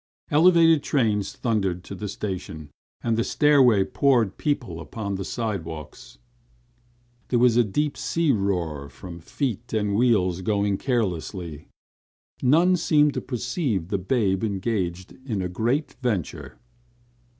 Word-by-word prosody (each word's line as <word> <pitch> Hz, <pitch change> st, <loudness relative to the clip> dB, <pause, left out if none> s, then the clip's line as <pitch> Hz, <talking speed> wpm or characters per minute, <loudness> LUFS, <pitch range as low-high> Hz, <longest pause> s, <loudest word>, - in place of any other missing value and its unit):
Elevated 165 Hz, 0 st, +5 dB
trains 110 Hz, -8 st, 0 dB
thundered 95 Hz, -7 st, -1 dB
to -, -, -9 dB
the 105 Hz, +2 st, -5 dB
station 90 Hz, -7 st, -6 dB, 0.3 s
and 115 Hz, -1 st, +1 dB
the 115 Hz, -, +1 dB
stairway 130 Hz, -10 st, +4 dB
poured 120 Hz, -2 st, +1 dB
people 125 Hz, -, -2 dB
upon 100 Hz, +6 st, -5 dB
the 95 Hz, 0 st, -3 dB
side 110 Hz, -5 st, -3 dB
walks. 75 Hz, -6 st, -10 dB, 1.1 s
There 125 Hz, -, +1 dB
was 120 Hz, -1 st, +4 dB
a 120 Hz, -, +5 dB
deep 145 Hz, +8 st, -1 dB
sea 165 Hz, -3 st, 0 dB
roar 85 Hz, -, -1 dB
from 85 Hz, -2 st, -10 dB
feet 120 Hz, -, -4 dB
and 105 Hz, -2 st, 0 dB
wheels 100 Hz, -6 st, +2 dB
going 100 Hz, 0 st, 0 dB
ceaselessly. 90 Hz, -, -3 dB, 0.7 s
None 170 Hz, +8 st, +4 dB
seemed 150 Hz, -3 st, +3 dB
to -, -, -3 dB
perceive 125 Hz, -, -2 dB
the 100 Hz, -, -1 dB
babe 95 Hz, -1 st, 0 dB
engaged 95 Hz, -4 st, -2 dB
in 115 Hz, -7 st, -3 dB
a 90 Hz, -, -1 dB
great 120 Hz, -, -1 dB
venture. 105 Hz, -, -3 dB
105 Hz, 130 wpm, -24 LUFS, 95-125 Hz, 1.1 s, Elevated